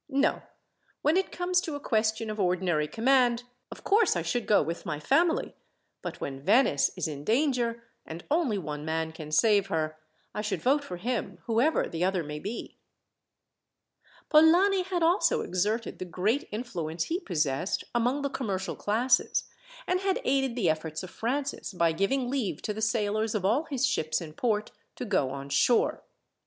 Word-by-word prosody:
No. 275 0 +1 0.6
When 300 +3 +3
it 380 +1 +1
comes 360 0 +1
to 320 -5 -4
a - - -4
question 220 -3 0
of 215 - -6
ordinary 180 -5 +1
command, 245 - +2 0.3
of - - -10
course 420 - +3
I 170 - -1
should 235 +8 -2
go 210 - +5
with 165 +3 -4
my 150 -6 -4
family; 325 - +2 0.5
but - - -6
when 135 -1 -5
Venice 200 - +4
is - - -1
in 145 -2 -6
danger, 235 - +1 0.2
and 165 +2 -8
only 295 -10 +2
one 150 -5 -5
man 160 +1 -2
can 155 -2 -9
save 205 +4 +4
her, 155 -3 -2 0.3
I 210 - -2
should 210 -1 -2
vote 285 +3 +2
for 180 -9 -6
him, 205 -2 -3
whoever 240 +8 +2
the 165 +1 -3
other 185 -2 +1
may 150 0 -6
be." 210 +9 -6 1.5
Polani 350 +5 +5
had 360 -2 -1
also 345 +5 +3
exerted 210 +6 -1
the 185 - -4
great 210 - -1
influence 175 -8 -3
he 340 +2 -2
possessed 155 - -1
among 245 +4 +1
the 280 - 0
commercial 200 -9 -3
classes, 240 +5 +1 0.4
and 365 -4 +1
had 385 0 0
aided 270 -2 +1
the 220 -8 +1
efforts 160 0 -1
of 185 - -8
Francis, 270 -1 -3
by 170 -2 +2
giving 245 +10 0
leave 250 -6 -2
to 210 - -2
the 220 - -6
sailors 215 -1 0
of 195 -3 -1
all 240 +11 +2
his 275 -4 0
ships 160 -12 0
in 160 -3 -8
port 215 +1 -1 0.2
to - - -5
go 140 - +1
on 140 +1 -6
shore. 235 - +2
220 Hz, 175 wpm, -28 LUFS, 170-270 Hz, 1.5 s, go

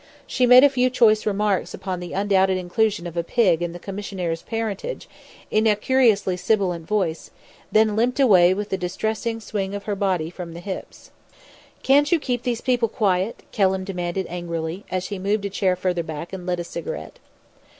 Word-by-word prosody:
She 250 -2 +1
made 250 +1 +9
a - - +9
few 255 -1 +2
choice 225 -4 +3
remarks 205 -2 0
upon 185 -2 -4
the 175 -1 -7
undoubted 190 -1 +2
inclusion 185 +1 0
of 170 -1 -7
a 170 - 0
pig 180 -3 +2
in 175 -1 -2
the 175 - -8
commissionaire's 190 -4 -4
parentage, 225 - -4 0.4
in 215 +1 +3
a 210 - +4
curiously 210 -5 +2
sibilant 180 -5 0
voice, 185 -6 -1 0.4
then 215 -1 +3
limped 245 +4 +1
away 185 -9 +6
with 205 0 -4
a - - +1
distressing 220 +5 -2
swing 200 -3 -4
of 200 - -6
her 205 0 -2
body 185 -5 -1
from 175 -2 -8
the - - -7
hips. 190 +1 -8 0.7
"Can't 285 +2 +4
you 345 - +4
keep 250 -4 -2
those 240 -2 -2
people 245 -3 +1
quiet?" 195 0 0
Kelham 190 -2 +1
demanded 180 -1 -3
angrily, 170 +1 -5
as 185 0 -3
he 200 -2 -4
moved 200 +2 -1
a 200 - -3
chair 190 -2 +1
further 180 -1 -1
back, 160 +2 -7
and 180 -1 -7
lit 180 -1 -1
a - - -2
cigarette. 480 - -7
195 Hz, 185 wpm, -23 LUFS, 180-220 Hz, 0.7 s, made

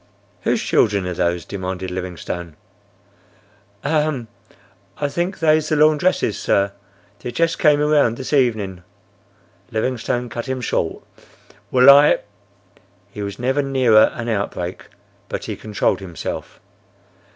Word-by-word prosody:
"Whose - - 0
children 100 -4 +2
are 90 - -2
those?" 85 0 -1
demanded 95 -1 -5
Livingstone. 90 -2 -5 1.3
"Ahem! 150 -6 0 0.7
I 145 - -1
thinks 175 +6 -3
they's 155 -1 +3
the 155 - +2
laundress's, 155 - +2
sir. 100 0 +1 0.5
They 125 - -5
just 165 +6 0
came 150 -2 +4
around 150 -6 +3
this 130 +2 -5
evening—" 110 -9 +1 0.9
Livingstone 120 +2 -2
cut 120 +1 -6
him 130 0 -2
short. 120 - -2 0.7
"Well! 130 +3 +8
I—!" 145 +1 +6 0.9
He 105 - -7
was 100 -1 -5
never 130 +4 0
nearer 130 -6 +4
an 120 0 -5
outbreak, 100 -5 -3 0.4
but - - -4
he - - -4
controlled 105 -1 -1
himself. 90 -5 -6
120 Hz, 120 wpm, -20 LUFS, 100-145 Hz, 1.3 s, Well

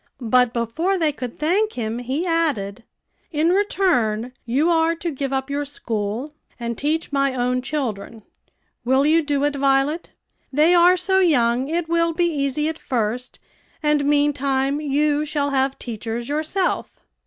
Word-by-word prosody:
But 250 -2 +5
before 245 - -1
they 320 -4 +2
could 250 -4 -7
thank 390 +9 +1
him, 230 -1 -3
he 265 +8 -2
added, 275 - -1 0.5
"In 320 +2 +2
return, 255 - +1
you 275 +7 +2
are 330 0 +2
to 335 0 -4
give 275 -1 -3
up 265 0 -1
your 285 +1 -1
school, 235 -1 -4 0.3
and 235 0 -3
teach 305 +5 -1
my 275 -1 +1
own 250 0 0
children. 235 -6 -4 0.6
Will 265 +3 +3
you 320 +2 +4
do 290 -2 -1
it, 290 0 +1
Violet? 275 +4 +1 0.4
They 305 +5 +4
are 355 +1 +6
so 380 +1 +2
young 255 -7 +2
it 330 +2 -1
will 335 0 +1
be 345 +2 +1
easy 300 -2 0
at 320 0 -4
first, 240 0 -2 0.5
and 300 -1 +2
meantime 280 -1 +1
you 295 +1 +1
shall 290 -2 -1
have 270 0 0
teachers 230 +1 -5
yourself." 315 +5 -1
285 Hz, 155 wpm, -22 LUFS, 250-320 Hz, 0.6 s, are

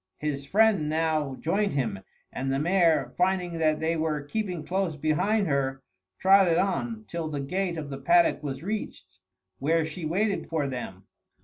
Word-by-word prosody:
His 140 -2 -3
friend 205 -7 +3
now 155 -3 0
joined 195 +8 0
him, 115 -8 -1 0.3
and 135 +1 -2
the 135 - +1
mare, 165 0 +2
finding 180 -2 +1
that 155 -1 +2
they 160 +1 0
were 155 -2 -1
keeping 180 -1 -3
close 185 -3 -1
behind 160 +9 +1
her, 135 -3 -1 0.3
trotted 190 -3 +5
on 220 +3 -1
till 165 -2 -4
the 145 -2 -3
gate 175 +5 -2
of 150 -3 -6
the 135 - -5
paddock 170 +2 +3
was 140 -1 -5
reached, 130 - -5 0.4
where 160 +3 +2
she 160 +2 -7
waited 195 +6 -1
for 155 -4 0
them. 120 -8 -6
160 Hz, 165 wpm, -27 LUFS, 145-185 Hz, 0.4 s, trotted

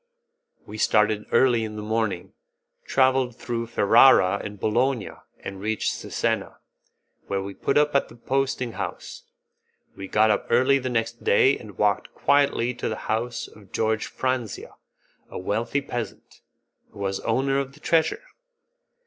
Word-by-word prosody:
We 110 - -9
started 105 0 +2
early 120 -3 +4
in 110 -1 -5
the 105 - -6
morning, 110 -4 -2 0.5
travelled 130 -2 +2
through 115 -2 -4
Ferrara 110 -3 +5
and 105 -1 -7
Bologna, 120 +2 0 0.3
and 95 0 -7
reached 110 +1 -1
Cesena, - - -2 0.7
where 100 -1 -2
we 100 0 -6
put 135 - 0
up 150 0 +3
at 140 - +1
the - - -14
posting 130 0 -1
house. - - -6 0.7
We 95 - -7
got 110 +2 +3
up 105 - -1
early 130 +4 +4
the 130 -1 -3
next 115 -1 -2
day 130 +7 +4
and 105 -5 -12
walked 105 -1 0
quietly 140 -4 +2
to - - -4
the 110 - -2 0.2
house 115 +2 -2
of 100 -3 -18
George 110 -1 0
Franzia, 130 -5 -3 0.6
a - - -7
wealthy 115 +8 -1
peasant, 120 -4 -7 0.5
who - - -18
was 95 -1 -2
owner 135 +1 0
of 135 0 -4
the 150 - -17
treasure. 165 - +1
115 Hz, 150 wpm, -24 LUFS, 105-130 Hz, 0.7 s, Ferrara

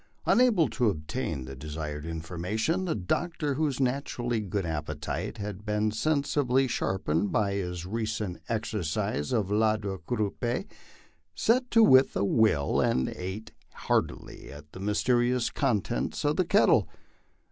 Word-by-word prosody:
Unable 230 -10 +4
to 120 -5 +1
obtain 80 - -3
the 65 - -8
desired 75 +2 -5
information, 90 - -2
the 170 - -1
Doctor, 150 - -1
whose 145 -2 -1
naturally 125 -3 -1
good 100 -2 -2
appetite 80 -2 -4
had 105 -1 -6
been 105 0 0
sensibly 140 0 +1
sharpened 95 -5 -1
by 100 -2 +1
his 90 -3 -3
re 110 +3 -2
cent 100 -5 -3
exercise 105 -10 -2
a 115 - +3
la 110 +2 +2
quadrupede, 105 - -2 0.7
set 250 +2 +2
to 230 - +6
with 130 -8 +6
a - - +1
will 100 -10 +2
and 65 0 +1
ate 95 +4 -6 0.2
heartily - - -2
of 75 +1 -10
the - - -10
myste 105 +5 +1
rious 120 0 +1
contents 125 0 -1
of 145 +1 +2
the 185 - +1
kettle. 200 +5 +4
105 Hz, 135 wpm, -28 LUFS, 90-130 Hz, 0.7 s, to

